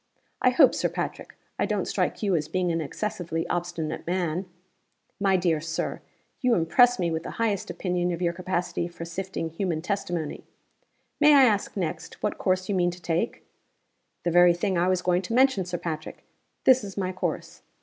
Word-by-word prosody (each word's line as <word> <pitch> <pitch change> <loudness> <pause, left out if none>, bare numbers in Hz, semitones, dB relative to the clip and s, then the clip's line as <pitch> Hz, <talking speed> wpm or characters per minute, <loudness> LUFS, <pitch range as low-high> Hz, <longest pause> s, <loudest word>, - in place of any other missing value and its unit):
_ - - -43 0.2
'I - - +5
hope, - - +6
Sir - - 0
Patrick, - - -5 0.2
I - - +2
don't - - -1
strike - - -1
you 195 -3 +2
as 155 -2 -1
being 180 +2 0
an 165 0 0
excessively 170 -1 -3
obstinate 175 -3 -3
man?' 180 0 -1 0.7
'My 195 -1 +3
dear 170 -4 +1
Sir, 160 0 -3 0.4
you 250 -3 +3
impress 245 +9 +4
me 170 -2 0
with 160 0 -1
the - - -7
highest 215 -4 0
opinion 180 0 -1
of 170 - -3
your 170 -1 0
capacity 180 -1 -2
for 170 -1 -8
sifting 170 -1 -4
human 165 -1 -2
testimony! 175 -5 -3 0.8
May 300 0 +7
I 275 - +8
ask, 210 -3 0
next, 170 -2 -4
what 210 - -1
course 185 0 +1
you 205 - -1
mean 175 -2 +2
to 175 +1 -8
take?' 170 +6 -2 0.8
'The 175 - 0
very 175 0 +6
thing 190 +2 -1
I 175 +1 +2
was 185 -1 +1
going 180 0 +2
to 210 +5 -3
mention, 260 -7 +4
Sir 180 0 -3
Patrick! 155 -2 -6 0.4
This 260 -3 +5
is 200 -1 -8
my 185 -2 -1
course. 185 - -4
180 Hz, 190 wpm, -26 LUFS, 170-195 Hz, 0.8 s, I